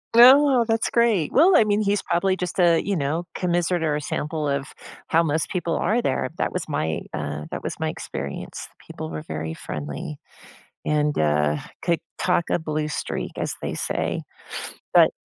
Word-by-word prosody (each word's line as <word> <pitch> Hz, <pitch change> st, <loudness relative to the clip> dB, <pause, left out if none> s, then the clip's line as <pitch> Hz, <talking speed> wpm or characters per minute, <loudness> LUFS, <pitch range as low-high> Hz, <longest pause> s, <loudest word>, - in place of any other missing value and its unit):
No, 260 Hz, +1 st, +8 dB
that's 225 Hz, -1 st, +1 dB
great. 225 Hz, -9 st, +2 dB
Well, 345 Hz, +6 st, +6 dB
I -, -, +7 dB
mean, 210 Hz, 0 st, +1 dB
he's 205 Hz, -1 st, +1 dB
probably 185 Hz, +2 st, +1 dB
just 180 Hz, 0 st, -4 dB
a, 170 Hz, -2 st, +5 dB
you 200 Hz, -, 0 dB
know, 160 Hz, +2 st, -1 dB
commiserate 175 Hz, -1 st, 0 dB
or 155 Hz, -2 st, +1 dB
a 150 Hz, -, -2 dB
sample 150 Hz, +1 st, -2 dB
of 140 Hz, -1 st, 0 dB, 0.4 s
how 165 Hz, -, +4 dB
most 155 Hz, -1 st, 0 dB
people 175 Hz, -3 st, -1 dB
are 235 Hz, +3 st, +1 dB
there. 130 Hz, -, 0 dB
That -, -, 0 dB
was 180 Hz, -4 st, -3 dB
my, 80 Hz, -, -1 dB
uh, 75 Hz, 0 st, -4 dB
that -, -, -4 dB
was -, -, -4 dB
my -, -, 0 dB
experience. 70 Hz, 0 st, -6 dB, 0.2 s
People 80 Hz, -, -6 dB
were 80 Hz, -1 st, -4 dB
very 80 Hz, +1 st, -4 dB
friendly 75 Hz, -1 st, -6 dB, 0.7 s
and, 150 Hz, -1 st, +1 dB
uh, 75 Hz, -1 st, +2 dB, 0.2 s
could 170 Hz, -1 st, +1 dB, 0.2 s
talk 180 Hz, -2 st, +1 dB
a -, -, +2 dB
blue 155 Hz, -2 st, -2 dB
streak, 150 Hz, -, -3 dB
as -, -, -2 dB
they -, -, -2 dB
say, -, -, -1 dB, 0.7 s
but -, -, +7 dB
165 Hz, 175 wpm, -24 LUFS, 140-195 Hz, 0.7 s, No